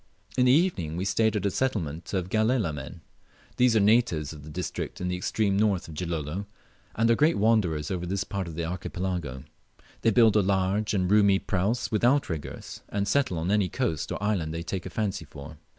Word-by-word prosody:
In 125 - +3
the 125 - +6
evening 130 - +1
we 95 - -2
stayed 110 +2 +2
at 100 -2 -1
a 100 - +2
settlement 90 - -2
of 95 -2 -2
Galela 110 -5 +1
men. 75 +3 -8 0.6
These 125 -2 +4
are - - +5
natives 100 - +2
of 75 -2 -11
a 75 - -10
district 90 +4 -5
in 90 - -2
the 90 - -1
extreme 100 +2 0
north 100 -4 +1
of 80 - -9
Gilolo, 85 +3 -4 0.5
and 115 +1 +3
are - - +5
great 155 +7 +3
wanderers 100 -9 +1
over 90 -2 -3
this 95 +2 -1
part 100 -3 -4
of 80 - -7
the 85 0 -2
Archipelago. 85 -5 -4 0.6
They 115 - +3
build 110 -1 +5
large 100 +2 +1
and 90 -1 +1
roomy 100 -2 +5
praus 100 +5 -1
with 110 - 0
outriggers, 120 - -1
and 100 0 -1
settle 130 -10 +1
on 85 +4 -1
any 105 -3 +2
coast 120 - -2
or - - -4
island 90 -7 -1
they 85 - -4
take 90 +1 -4
a - - -6
fancy 100 -5 -2
for. 75 +1 -11
95 Hz, 200 wpm, -27 LUFS, 85-110 Hz, 0.6 s, the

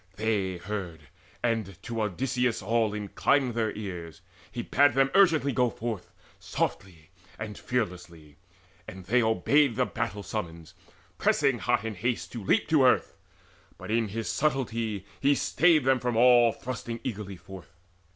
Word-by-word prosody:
They 100 -4 -1
heard, 90 -3 -6 0.4
and 110 -6 -1
to 115 -2 -3
Odysseus 125 +4 -1
all 110 +1 +1
inclined 120 +5 +1
Their 110 -2 0
ears: 90 -6 -7 0.3
he - - -4
bade 145 +2 +3
them 135 0 +3
urgently 165 -8 +4
go 125 -1 +2
forth 110 -4 -5 0.3
Softly 85 -3 -4 0.3
and 105 -1 -6
fearlessly; 90 - -4 0.5
and 95 -1 -9
they 125 +6 +3
obeyed 115 +5 +3
That 125 -1 -1
battle 115 -4 -3
summons, 85 -7 -6 0.5
pressing 140 -2 +3
in - - -11
hot 120 0 +1
haste 115 +2 -3
To 115 -4 -6
leap - - +2
to 155 -4 +4
earth: 125 - +3 0.6
but - - -7
in 115 -1 +1
his 110 +2 -4
subtlety 115 -8 -1
He 140 +1 +3
stayed 165 +1 +3
them 130 -1 +3
from 120 -2 -1
all 120 -1 +6
thrusting 120 -1 -6
eagerly 100 -5 -5
forth. 90 -2 -13
115 Hz, 145 wpm, -28 LUFS, 95-125 Hz, 0.6 s, all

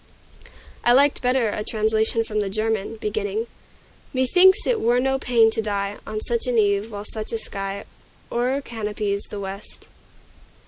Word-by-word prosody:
I 240 - +5
liked 280 +2 +4
better 250 -2 +2
a 210 - -3
translation 220 +1 +1
from 215 -1 -2
the 205 -2 -1
German, 215 +1 -1
beginning 210 0 -2 0.7
"Methinks 365 - +5
it 480 -3 +1
were 240 +2 +3
no 265 +1 +1
pain 230 -4 +4
to 225 - -1
die 205 -1 -2
On 215 - -3
such 235 +2 -2
an 245 -2 +1
eve, 205 0 +2
while 205 0 -6
such 215 0 -5
a 230 - -1
sky 195 -2 -5 0.5
O'ercanopies 220 -5 -2
the 205 - -6
west." 195 +1 -8
220 Hz, 150 wpm, -23 LUFS, 205-245 Hz, 0.7 s, I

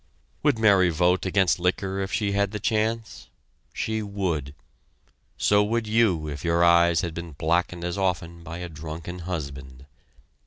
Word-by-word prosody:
Would 145 -5 +2
Mary 100 -5 +5
vote 90 +3 +2
against 95 -2 +2
liquor 95 +2 -1
if 95 -1 -3
she 105 -2 0
had 100 0 +1
the 105 +1 -5
chance? 110 +2 -2 0.4
She 110 0 -2
would. 90 -9 -3 0.8
So 105 0 +4
would 115 +2 -1
you 105 -8 +2
if 75 -1 -6
your 85 0 +2
eyes 85 -1 +5
had 85 -2 -4
been 85 -1 -7
blackened 85 +3 0
as 90 +3 -3
often 85 -3 -2
by 85 0 -7
a 90 0 -5
drunken 80 +3 -7
husband. 70 -7 -6
90 Hz, 155 wpm, -25 LUFS, 85-100 Hz, 0.8 s, Mary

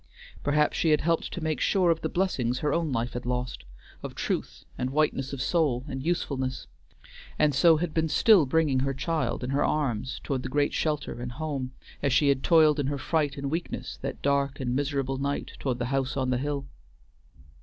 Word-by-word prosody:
Perhaps 150 +1 +2
she 165 - +2
had 150 -1 +4
helped 165 +1 0
to 175 - -5
make 155 -1 -1
sure 185 -4 +3
of 165 - -1
the - - -1
blessings 130 -10 0
her 150 - 0
own 165 -3 0
life 120 0 -1
had 125 - -4
lost, 125 - -3 0.4
of - - -7
truth - - -3
and 125 - -2
whiteness 140 -1 0
of 140 -1 -3
soul 140 -8 +1
and 130 -1 -4
usefulness; 140 -6 -2 0.7
and 150 -1 +3
so 160 +4 +5
had 160 0 -2
been 160 -1 +1
still 200 - +5
bringing 145 -2 +2
her 135 +1 0
child 150 -5 -1
in 125 - -2
her 140 +1 +2
arms 130 -5 -1
toward 135 -3 -2
the - - -5
great 145 0 +1
shelter 150 -5 -2
and 120 0 -5
home, 135 -3 -4 0.3
as 140 - +1
she 140 +2 +4
had 135 -1 +2
toiled 155 -2 +5
in 140 - 0
her 145 0 -1
fright 145 0 0
and 140 0 -3
weakness 165 +2 -4
that - - -5
dark 140 0 +1
and 125 -2 -1
miserable 135 -1 -1
night 140 +1 -2
toward 130 -3 -1
the 120 - -2
house 135 0 0
on 130 -1 0
the 125 - +1
hill. 140 0 -2
140 Hz, 205 wpm, -27 LUFS, 130-155 Hz, 0.7 s, so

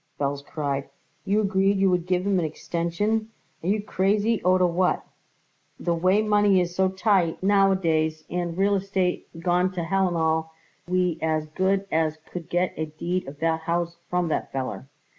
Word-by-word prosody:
Belz 140 0 -1
cried. 140 -2 -3 0.4
"You 205 +2 +2
agreed 195 0 +2
you 195 -1 +3
would 180 -1 0
give 180 0 +1
him 200 -2 +2
an 170 - 0
extension! 170 +8 -2 0.3
Are - - -3
you 205 +2 +1
crazy 205 +3 +1
oder 185 0 +4
what? 180 +1 +1 0.7
The 170 - 0
way 185 +5 +3
money 205 -2 +4
is 175 -1 -1
so 190 0 +3
tight 190 -3 +1
nowadays 175 -6 +2
and 175 -1 -3
real 200 +1 +3
estate 190 -2 -1
gone 180 +1 +2
to 175 -2 -3
hellandall, 165 -3 +1 0.4
we 180 -2 +1
as 155 -1 0
good 190 +4 +1
as 160 -1 +1
could 175 -1 -7
get 175 +1 0
a 160 - -2
deed 170 +3 -3
of 140 +1 -8
that 165 0 +1
house 170 +1 -2
from 180 -1 0
that - - -2
feller." 135 0 -4
180 Hz, 165 wpm, -25 LUFS, 165-195 Hz, 0.7 s, oder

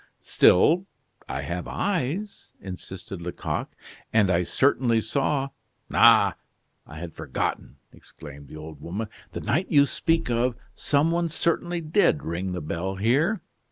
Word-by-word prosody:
"Still 170 - +4 0.4
I - - -3
have 85 +1 -4
eyes," 195 +2 -3
insisted 95 0 -8
Lecoq, 90 +1 -3 0.4
"and 105 -4 +4
I 85 0 +3
certainly 120 +4 +2
saw 135 +4 0 0.2
" - - -47
"Ah! - - +6 0.5
I 75 - -10
had 85 0 -7
forgotten," - - -3 0.2
exclaimed 70 -2 -12
the 75 - -10
old 75 -1 -10
woman. 100 +6 -4 0.2
"The - - -4
night 175 +6 0
you 140 -3 +6
speak 165 +5 0
of 120 +1 +1 0.2
some 150 +3 +1
one 170 0 0
certainly 170 +2 -1
did 160 -1 +2
ring 90 +3 -3
the 90 - -4
bell 85 +5 -3
here. 140 - +2
120 Hz, 140 wpm, -25 LUFS, -, 0.5 s, Ah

